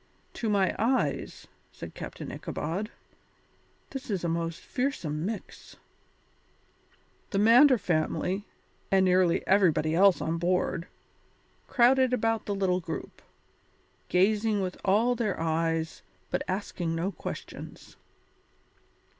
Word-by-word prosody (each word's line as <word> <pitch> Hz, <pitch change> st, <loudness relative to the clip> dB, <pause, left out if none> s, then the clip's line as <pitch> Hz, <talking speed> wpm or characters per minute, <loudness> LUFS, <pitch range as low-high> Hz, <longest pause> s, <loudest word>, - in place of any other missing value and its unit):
"To 225 Hz, -, -2 dB
my 195 Hz, -3 st, +2 dB
eyes," 245 Hz, +5 st, 0 dB, 0.3 s
said -, -, -9 dB
Captain -, -, -7 dB
Ichabod, 190 Hz, +8 st, -4 dB, 1.0 s
"this 270 Hz, -2 st, -7 dB
is 195 Hz, -4 st, -1 dB
a -, -, 0 dB
most 165 Hz, 0 st, -2 dB
fearsome 180 Hz, -, -2 dB
mix." 220 Hz, -1 st, -7 dB, 1.5 s
The 195 Hz, -, -2 dB
Mander 245 Hz, +6 st, +7 dB
family, 185 Hz, +1 st, -1 dB, 0.5 s
and 190 Hz, -1 st, +4 dB
nearly 180 Hz, -2 st, +3 dB
everybody 170 Hz, -5 st, +3 dB
else 190 Hz, +2 st, +5 dB
on 165 Hz, +1 st, -2 dB
board, 180 Hz, 0 st, 0 dB, 0.8 s
crowded 255 Hz, +1 st, +4 dB
about 225 Hz, -2 st, 0 dB
the 205 Hz, -, -1 dB
little 185 Hz, -2 st, +1 dB
group, 165 Hz, -2 st, -7 dB, 0.9 s
gazing 210 Hz, +3 st, +2 dB
with 185 Hz, -1 st, -2 dB
all 215 Hz, +6 st, +3 dB
their 225 Hz, -5 st, -2 dB
eyes 165 Hz, 0 st, -1 dB, 0.3 s
but 180 Hz, -, 0 dB
asking 180 Hz, -3 st, -2 dB
no 175 Hz, +4 st, -1 dB
questions. 175 Hz, -, -8 dB
190 Hz, 110 wpm, -28 LUFS, 170-220 Hz, 1.5 s, Mander